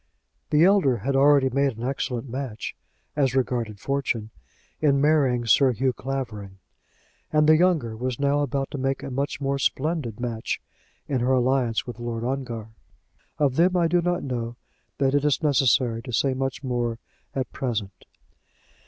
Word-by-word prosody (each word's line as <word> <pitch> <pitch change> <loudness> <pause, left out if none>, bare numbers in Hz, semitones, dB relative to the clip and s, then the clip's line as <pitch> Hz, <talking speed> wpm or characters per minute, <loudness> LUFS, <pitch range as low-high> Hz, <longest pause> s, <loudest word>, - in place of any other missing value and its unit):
The 150 +2 +4
elder 185 -11 +4
had 135 +6 -2
already 140 -1 +5
made 140 -2 +1
an 115 - -6
excellent 130 -2 -3
match, 125 -3 -5 0.4
as 135 -3 +1
regarded 120 -5 -1
fortune, 120 -4 -2 0.5
in 140 -3 +3
marrying 135 -5 +3
Sir 130 +3 +4
Hugh 130 +3 0
Clavering; 115 -8 -5 0.7
and 150 0 +3
the 155 - +7
younger 160 -10 +2
was 125 +1 -3
now 140 +1 +2
about 140 -1 -1
to 140 - -4
make 135 0 -1
a 135 - -5
much 135 -1 -2
more 140 0 -1
splendid 135 -5 -1
match 115 -2 -3 0.5
in 135 -3 0
her 125 +2 +1
alliance 125 -2 +1
with 120 -1 -8
Lord 120 -1 -4
Ongar. 120 -4 -3 0.7
Of 140 -3 +1
them 180 +2 +4
I 170 -1 +3
do 175 +1 +2
not 175 +1 -1
know 120 -3 -3 0.4
that 135 -1 +2
it 145 0 +2
is 150 +2 +1
necessary 130 -5 +3
to 125 +1 -8
say 130 +5 +1
much 135 +2 -3
more 120 -3 -1 0.4
at 130 -2 -2
present. 110 -7 -4
135 Hz, 160 wpm, -25 LUFS, 120-140 Hz, 0.7 s, the